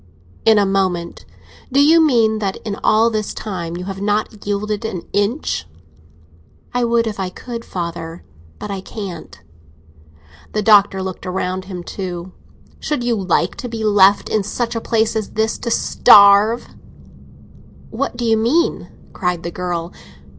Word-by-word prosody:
"In 220 -1 +6
a 205 - +4
moment. 185 -3 -1 0.5
Do 270 - +3
you 320 +3 +6
mean 225 -7 +3
that 195 -2 -2
in 205 -2 -3
all 225 +2 +4
this 215 -1 -3
time 175 -5 -5
you 180 - -6
have 195 0 -6
not 210 0 -2
yielded 205 +1 -2
an 190 -6 -4
inch?" 205 - -1 1.1
"I 245 0 +1
would 235 0 +2
if 215 -2 -4
I 190 -1 -2
could, 230 +5 -8
father; 170 -3 -6 0.3
but 210 - -6
I 195 -1 -4
can't." 190 -4 -8 1.1
The 215 - -1
Doctor 200 -3 +4
looked 185 0 -6
round 185 0 -3
him 180 -2 -7
too. 180 -1 -6 0.5
"Should 295 -5 -2
you 240 0 +1
like 190 -5 0
to 245 - -6
be 225 -1 -5
left 205 -2 +4
in 215 - +1
such 235 +4 -3
a 230 - -2
place 225 -1 0
as 215 -2 -3
this, 220 0 -1
to 235 - -4
starve?" 210 0 +5 1.2
"What - - -3
do 240 - -2
you 225 -1 +3
mean?" 265 +11 +1 0.2
cried 180 -2 -2
the 170 - -4
girl. 175 -1 -4
205 Hz, 155 wpm, -19 LUFS, 185-225 Hz, 1.2 s, In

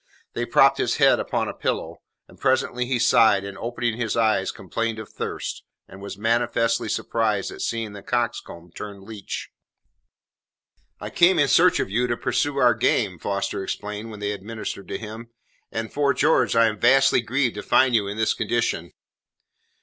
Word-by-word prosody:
They - - -2
propped - - +4
his - - +1
head - - +4
upon - - -1
a - - -4
pillow, - - -3 0.3
and - - -19
presently 125 0 +1
he 130 -1 0
sighed 115 -4 +4
and, 100 -1 -7
opening 120 +1 -3
his 120 -1 -2
eyes, 110 -4 +2
complained 115 +5 -3
of 110 -2 -8
thirst, - - -5 0.3
and 95 - -13
was 100 -1 -7
manifestly 115 +1 0
surprised 110 -4 -1
at - - -9
seeing 115 -2 -3
the 100 - -9
coxcomb 100 -7 -3
turned 100 0 -8
leech. 105 -1 -7 1.5
"I - - -7
came 175 +1 +4
in 145 -3 +4
search 180 +5 +4
of - - -2
you 125 +4 +1
to 120 -1 -1
pursue 145 +3 -1
our 125 -3 +5
game," 105 -5 0
Foster 100 +1 -2
explained 105 +3 -5
when 105 -2 -9
they 105 0 -1
had 100 -2 -6
ministered 110 -2 -6
to - - -4
him, 115 +1 -9 0.4
"and, 110 0 -4
'fore 140 -2 +1
George, 150 -3 +2
I 115 0 +5
am 105 -2 -1
vastly 130 +1 +4
grieved 125 +1 0
to 105 - -6
find 130 -1 +3
you 105 -3 +2
in 100 +2 -5
this 110 0 +2
condition." 110 -6 -2
115 Hz, 180 wpm, -23 LUFS, 105-120 Hz, 1.5 s, our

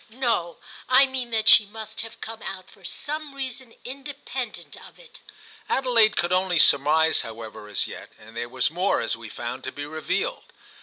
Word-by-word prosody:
"No, 225 -8 0 0.3
I 260 +2 +8
mean 260 -2 -3
that 220 -1 0
she 220 - +9
must 220 +1 -6
have 225 0 -9
come 225 0 -7
out 185 -1 -7
for 195 - -20
some 295 - -4
reason 260 -3 -6
independent 270 -1 -6
of - - -14
it." - - -16 0.5
Adelaide 235 -5 +4
could 175 +1 +2
only 185 -1 +2
surmise, 150 +2 +5
however, 110 -2 -8
as 105 - -1
yet, - - -8
and 110 +1 -15
there 120 +1 -3
was 130 +3 +1
more, 180 +4 +1
as 115 - -1
we 115 -1 -9
found, 120 +4 -5
to 130 - -4
be 145 +1 -6
revealed. 155 +1 -2
205 Hz, 175 wpm, -25 LUFS, -, 0.5 s, she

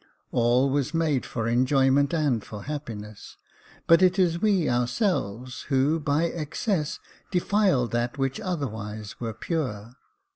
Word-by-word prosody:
All 125 +3 +3
was 140 +3 0
made 155 -5 +1
for 115 -1 -3
enjoyment 135 +3 +3
and 145 -9 +1
for 105 -2 -8
happiness; 110 -8 -7 0.5
but 165 +2 +6
it 185 +1 +4
is 170 -2 +2
we 200 -7 +2
ourselves 125 - -1
who, 140 +4 +2
by 150 +1 +1
excess, 165 +1 -2 0.3
defile 185 - +2
that 120 +3 -2
which 135 +6 -1
otherwise 110 - -5
were 115 -2 -4
pure. 120 - -3
140 Hz, 125 wpm, -26 LUFS, 120-165 Hz, 0.5 s, but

